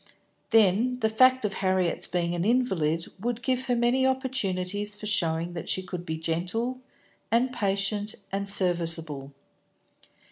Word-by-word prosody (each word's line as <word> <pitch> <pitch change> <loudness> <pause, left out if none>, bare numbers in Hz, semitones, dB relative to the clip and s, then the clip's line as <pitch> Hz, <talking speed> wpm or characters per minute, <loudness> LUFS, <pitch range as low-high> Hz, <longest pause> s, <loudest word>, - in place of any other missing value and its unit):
Then 225 +3 +3
the 220 - +2
fact 255 +2 +4
of 200 - -1
Harriet's 185 -3 0
being 175 -1 -1
an 175 0 -2
invalid 185 -9 +1
would 240 +3 -3
give 255 +1 0
her 245 - +1
many 240 +2 +2
opportunities 210 -7 -1
for 210 - -8
showing 170 -4 0
that 165 - -6
she 185 - 0
could 180 -1 -7
be 160 0 -3
gentle 180 +10 -2 0.5
and 240 +3 +2
patient 200 +1 0 0.2
and 200 +1 0
serviceable. 165 -7 +2
200 Hz, 140 wpm, -26 LUFS, 175-240 Hz, 0.5 s, fact